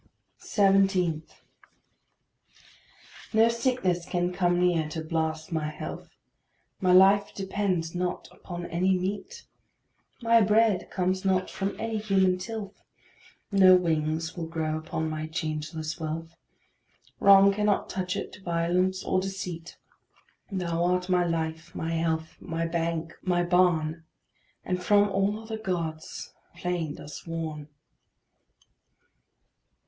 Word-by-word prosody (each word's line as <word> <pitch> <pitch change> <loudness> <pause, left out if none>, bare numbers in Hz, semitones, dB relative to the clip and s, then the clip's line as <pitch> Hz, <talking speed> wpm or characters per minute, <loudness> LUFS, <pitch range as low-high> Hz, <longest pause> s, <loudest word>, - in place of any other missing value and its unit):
17. 195 -5 +2 2.1
No 225 +1 +5
sickness 230 -7 0
can 175 0 -1
come 175 -1 +2
near 170 -4 +2
to 160 +1 -4
blast 160 +1 -2
my 155 -2 -1
health; 155 - -7 0.7
My 185 -1 +2
life 195 +2 +5
depends 190 -4 -1
not 180 0 -2
upon 175 -1 -7
any 185 +3 +1
meat; 205 - -4 0.7
My 230 -1 +4
bread 215 -1 +3
comes 185 0 -1
not 185 -1 +1
from 195 +1 -3
any 225 -1 -2
human 190 -3 +2
tilth; 210 0 -6 0.7
No 190 -2 +7
wings 160 -1 0
will 165 -2 -4
grow 160 -1 -2
upon 160 0 -3
my 155 0 -3
changeless 155 0 -4
wealth; 165 +1 -5 0.8
Wrong 200 0 +7
cannot 210 0 +1
touch 185 -1 -3
it, - - -5
violence 180 +2 0
or 185 - +1
deceit; 180 -3 -6 0.7
Thou 170 -3 -1
art 180 +1 +1
my 180 -1 +3
life, 160 -1 -3
my 165 - -3
health, 160 -1 -1
my 165 -1 -3
bank, 165 0 -2
my 175 -2 +1
barn 170 -3 +2 0.6
And 180 0 -1
from 205 +1 +4
all 195 +2 0
other 220 0 -6
gods 165 -6 -4 0.2
thou - - -16
plain 175 -4 -2
dost 150 - -10
warn. 160 -3 -4
180 Hz, 120 wpm, -27 LUFS, 165-195 Hz, 2.1 s, No